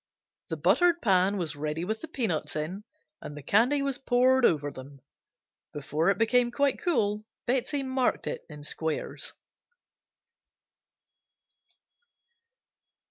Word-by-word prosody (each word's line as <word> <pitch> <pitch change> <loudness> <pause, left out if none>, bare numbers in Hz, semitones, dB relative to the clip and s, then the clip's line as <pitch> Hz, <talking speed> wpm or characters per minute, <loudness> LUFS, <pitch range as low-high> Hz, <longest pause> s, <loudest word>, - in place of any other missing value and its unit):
The - - -3
buttered 350 -1 +3
pan 195 -1 +3
was 160 -5 -2
ready 150 +3 -3
with 220 +3 -3
the 325 - -6
peanuts 210 - -2
in 175 +7 -4 0.4
and 145 - -8
the 150 - -9
candy 250 - +3
was 275 -2 -2
poured 255 0 +3
over 145 -3 +2
them. 135 +1 -11 0.7
Before 150 +4 0
it 195 - +2
became 240 +2 +3
quite 280 - 0
cool 210 - 0 0.2
Betsey 265 +3 0
marked 260 -1 0
it - - -4
in 150 -1 -10
squares. 160 +1 -3
210 Hz, 120 wpm, -28 LUFS, 155-260 Hz, 0.7 s, buttered